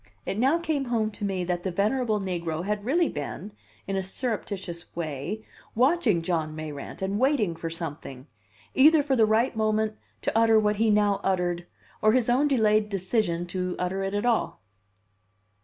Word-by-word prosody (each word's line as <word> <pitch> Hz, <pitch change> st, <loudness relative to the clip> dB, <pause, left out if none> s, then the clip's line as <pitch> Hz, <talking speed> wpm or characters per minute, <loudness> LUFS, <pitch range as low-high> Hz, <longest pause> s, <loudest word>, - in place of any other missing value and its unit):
It 195 Hz, -, -2 dB
now 270 Hz, +7 st, +4 dB
came 315 Hz, -5 st, -1 dB
home 225 Hz, -3 st, 0 dB
to 210 Hz, -, -9 dB
me 190 Hz, -2 st, -1 dB
that 175 Hz, 0 st, -2 dB
the 190 Hz, -, -2 dB
venerable 215 Hz, +4 st, +1 dB
negro 170 Hz, -3 st, -3 dB
had 210 Hz, 0 st, -2 dB
really 330 Hz, +6 st, +3 dB
been, 145 Hz, -7 st, -5 dB, 0.3 s
in 195 Hz, -, -3 dB
a 190 Hz, -, +1 dB
surreptitious 190 Hz, -4 st, -4 dB
way, 165 Hz, +6 st, -4 dB, 0.3 s
watching 245 Hz, -, +3 dB
John 160 Hz, -3 st, -1 dB
Mayrant, 155 Hz, +2 st, -6 dB
and 195 Hz, +2 st, -1 dB
waiting 255 Hz, -, +2 dB
for 165 Hz, 0 st, -5 dB
something 150 Hz, -5 st, -6 dB, 0.5 s
either 300 Hz, +3 st, +6 dB
for 275 Hz, -2 st, +1 dB
the 225 Hz, -3 st, +4 dB
right 225 Hz, +4 st, +2 dB
moment 215 Hz, 0 st, +1 dB, 0.3 s
to -, -, -1 dB
utter 225 Hz, -1 st, +5 dB
what 210 Hz, -1 st, +1 dB
he 225 Hz, +1 st, +3 dB
now 205 Hz, -1 st, +3 dB
uttered, 175 Hz, -2 st, 0 dB, 0.3 s
or 215 Hz, 0 st, +4 dB
his 245 Hz, -1 st, +2 dB
own 270 Hz, +4 st, +3 dB
delayed 215 Hz, -5 st, +3 dB
decision 185 Hz, -3 st, -1 dB
to 180 Hz, -1 st, -2 dB
utter 180 Hz, +2 st, -2 dB
it 195 Hz, +1 st, -2 dB
at 205 Hz, +3 st, -1 dB
all. 235 Hz, -2 st, +1 dB
205 Hz, 175 wpm, -26 LUFS, 175-230 Hz, 0.5 s, either